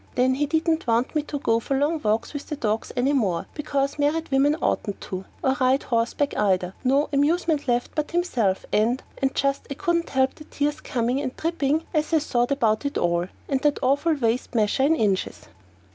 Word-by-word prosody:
Then 255 +1 +3
he 290 +3 0
didn't 320 +1 0
want 235 +2 +1
me 305 - +1
to 295 0 -5
go 230 -5 +1
for 270 +4 -1
long 300 +3 0
walks 220 +1 0
with 285 - -6
the 300 - -3
dogs 220 -5 -2
any 265 +4 +2
more, 195 -11 0
because 280 -1 -2
married 300 +2 0
women 280 +3 +3
oughtn't 205 - -2
to, 190 0 -6 0.2
or 265 0 +2
ride 260 +2 +3
horseback 235 +4 0
either 185 -3 +1
no 275 +3 +3
amusement 300 +1 +1
left 245 0 0
but 300 -1 -2
himself; 250 - 0
and 235 +5 +2 0.2
and 270 - +3
I - - -22
just 275 0 -1
couldn't 340 -3 0
help 265 -1 +2
the 305 - -13
tears 295 +1 -2
coming 245 +2 -1
and 260 -3 -4
dripping 320 -2 0
as 305 0 0
I - - +6
thought 245 -5 0
about 225 -6 +1
it 280 0 -2
all 175 0 +1 0.2
and 270 -2 0
that 295 0 +2
awful 285 +5 +2
waist 240 -2 -1
measure 215 +3 +2
in 295 +4 +4
inches. 200 -8 -1
275 Hz, 200 wpm, -24 LUFS, 230-295 Hz, 0.2 s, I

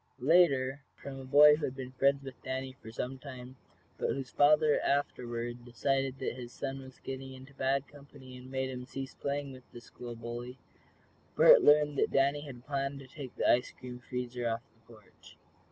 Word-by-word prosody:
Later, 140 -2 +3
from 135 -1 -8
a 135 - -8
boy 150 +2 +7
who 150 - -2
had 130 - -4
been 130 -1 -7
friends 140 +2 +2
with 135 -2 -10
Danny 130 0 -4
for 110 - -10
some 130 +3 -4
time, 130 -2 -9 0.4
but - - 0
whose 135 -2 -3
father, 150 +1 +5
afterward, 120 -4 -2
decided 135 +2 -1
that 130 - -3
his 120 -1 -8
son 135 0 -5
was 130 -1 -13
getting 135 0 -6
into 130 +1 -13
bad 135 +1 0
company, 140 -2 -14
and 125 +1 -11
made 130 0 -2
him 125 -1 -7
cease 135 0 -6
playing 140 0 -3
with 130 -1 -14
the 120 - -9
school 120 0 -9
bully, 120 +2 -7 0.8
Bert - - +8
learned 150 -1 +5
that - - +3
Danny 140 +2 +2
had 130 -4 -10
planned 140 -1 -2
to 135 - -10
take 135 -1 -9
the - - 0
ice 125 +1 +4
cream 125 -1 -8
freezer 125 -1 -3
off 115 +1 -2
the 115 +1 -22
porch. 110 -3 -18
130 Hz, 190 wpm, -31 LUFS, 125-140 Hz, 0.8 s, Bert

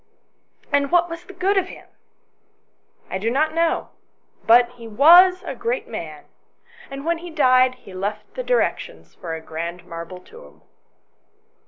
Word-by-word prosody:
"And 280 +1 +1
what 345 -1 +3
was 335 +1 -8
the 390 - -11
good 390 +2 0
of 375 - -4
him - - -13 0.4
?" - - -45
" - - -38
I 190 - -2
do 220 +4 -1
not 305 +6 0
know. 330 0 0 0.6
But 240 +1 +6
he 240 -2 -12
was 350 - +6
a - - -4
great 475 +2 -3
man, - - -8 0.6
and 275 +1 -8
when 335 0 0
he 350 +1 -9
died, 255 -5 +3
he 220 -6 -15
left 205 +3 -5
directions - - -2
for 165 -2 -6
a 160 - -8
grand 170 +2 -6
marble 170 +2 -8
tomb." 75 - -17
270 Hz, 160 wpm, -21 LUFS, -, 0.6 s, But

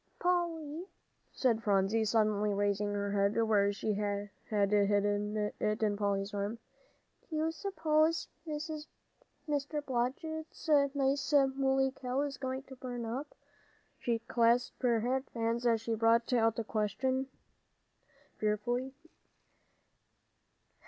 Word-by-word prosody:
"Polly," 340 -2 -1 0.4
said 235 -4 +1
Phronsie, 205 +1 +2
suddenly 210 -1 +2
raising 205 0 +1
her 200 0 -1
head 200 +2 +2
where 205 -2 +3
she 205 +1 -2
had 205 0 -2 0.2
hidden 205 0 +2 0.2
it 215 +1 0
on 210 -1 +2
Polly's 200 -1 -1
arm, 205 +3 -2 0.7
"do 320 - -4
you 315 +1 +1
suppose 320 -3 +1 0.2
Mr. 300 -1 -5
Blodgett's 275 +7 -3 0.3
nice 275 +1 +1 0.2
mooly 270 0 +2
cow 260 0 -2
is 285 -1 -3
going 260 0 -3
to 265 - -12
burn 245 -2 -5
up?" 260 +6 -5 0.6
She 235 -1 0
clasped 235 +1 +1
her 235 -3 +3
fat 260 +3 -1
hands 230 +1 0
as 230 -2 +3
she 230 - -2
brought 230 +2 +3
out 225 -2 +3
the 230 - -2
question 260 +5 -1 1.1
fearfully. 240 +5 -1
235 Hz, 115 wpm, -32 LUFS, 210-275 Hz, 1.1 s, where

